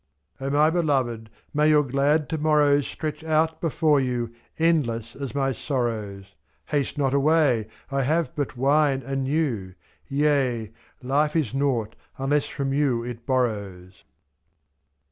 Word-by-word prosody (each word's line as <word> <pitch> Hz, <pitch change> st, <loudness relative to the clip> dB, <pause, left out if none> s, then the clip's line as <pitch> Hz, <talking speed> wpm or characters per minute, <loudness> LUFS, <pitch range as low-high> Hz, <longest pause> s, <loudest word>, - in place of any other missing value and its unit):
50 135 Hz, -, -6 dB
O -, -, -1 dB
my 155 Hz, +1 st, +5 dB
beloved, 130 Hz, -10 st, 0 dB, 0.2 s
may 150 Hz, +1 st, +3 dB
your 150 Hz, -1 st, +5 dB
glad 140 Hz, +3 st, +1 dB
to 160 Hz, -, -2 dB
morrows 145 Hz, -2 st, +3 dB
Stretch 155 Hz, 0 st, -5 dB
out 160 Hz, 0 st, +1 dB
before 155 Hz, -2 st, +2 dB
you, 120 Hz, -3 st, -2 dB, 0.2 s
endless 140 Hz, -9 st, 0 dB
as 140 Hz, -1 st, -6 dB
my 135 Hz, -1 st, +1 dB
sorrows; 110 Hz, -7 st, -3 dB
'^^^ -, -, -25 dB, 0.4 s
Haste 145 Hz, 0 st, -1 dB
not 135 Hz, -2 st, +1 dB
away, 140 Hz, -6 st, +3 dB, 0.2 s
I 135 Hz, 0 st, +1 dB
have 160 Hz, +5 st, 0 dB
but 145 Hz, -4 st, -3 dB
wine 140 Hz, 0 st, +2 dB
and 135 Hz, +1 st, -2 dB
you. 125 Hz, -, -1 dB, 0.3 s
Tea! 135 Hz, -6 st, +1 dB, 0.3 s
life 145 Hz, +4 st, +1 dB
is 150 Hz, -9 st, 0 dB
nought 125 Hz, -6 st, 0 dB, 0.2 s
unless 140 Hz, +2 st, 0 dB
from 135 Hz, -2 st, -3 dB
you 135 Hz, -5 st, +1 dB
it 120 Hz, -1 st, -8 dB
borrows. 100 Hz, -8 st, -2 dB
135 Hz, 145 wpm, -24 LUFS, 120-150 Hz, 0.4 s, my